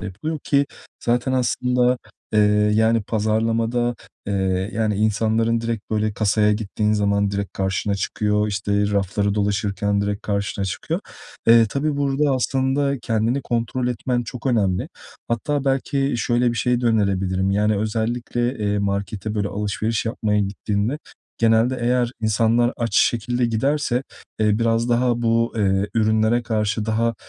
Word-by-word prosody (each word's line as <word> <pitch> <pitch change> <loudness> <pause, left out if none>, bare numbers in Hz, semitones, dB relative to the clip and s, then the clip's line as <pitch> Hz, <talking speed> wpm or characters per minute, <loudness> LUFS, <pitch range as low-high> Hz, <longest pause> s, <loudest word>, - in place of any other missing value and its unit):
de - - -7
yapılıyor, 110 - -4
ki 140 -1 +2 0.4
zaten 120 +2 +1
aslında, 125 0 +1 0.3
eee, 105 - +4 0.3
yani, 110 +1 +3
pazarlamada, 115 +3 0 0.3
eee, 95 -1 -1
yani, 110 -1 0
insanların 110 +2 +1
direkt, 115 -2 -4
böyle, 110 -1 0
kasaya 105 0 +2
gittiğin 105 0 -1
zaman 100 -1 +1
direkt 100 -1 -3
karşına 95 +1 -1
çıkıyor, 105 +1 0
işte, 100 0 0
rafları 100 +1 0
dolaşırken 100 0 0
direkt 100 0 -2
karşına 100 -1 -1
çıkıyor. 105 - -3 0.5
Eee, 115 0 +7
tabii 140 +5 -1
burada 140 +1 +1
aslında 135 +2 0
kendini 115 +3 0
kontrol 120 +1 -1
etmen 125 +1 -1
çok 120 +2 -7
önemli. 100 -8 +1 0.4
Hatta 140 +5 -1
belki 135 0 0
şöyle 120 +1 +1
bir 120 - -5
şey 125 0 +1
de 120 - 0
önerebilirim, 95 -4 +1
yani, 105 +2 +2
özellikle, 120 +3 -2
eee, 105 -1 0
markete, 100 +1 -2
böyle, 100 -1 -1
alışveriş 105 +2 -2
yapmaya 110 -2 0
gittiğinde 100 +5 -2 0.4
genelde 115 +3 +3
eğer 120 0 +1
insanlar 115 +2 +2
aç 115 -1 -1
şekilde 120 +1 +2
giderse, 130 +2 0 0.4
eee, 105 -1 +2
biraz 115 0 +1
daha 120 0 +1
bu, 115 0 +2
eee, 100 -2 +1
ürünlere 110 +1 +2
karşı 110 -1 -1
daha, 115 +1 +1
110 Hz, 140 wpm, -22 LUFS, 105-120 Hz, 0.5 s, Eee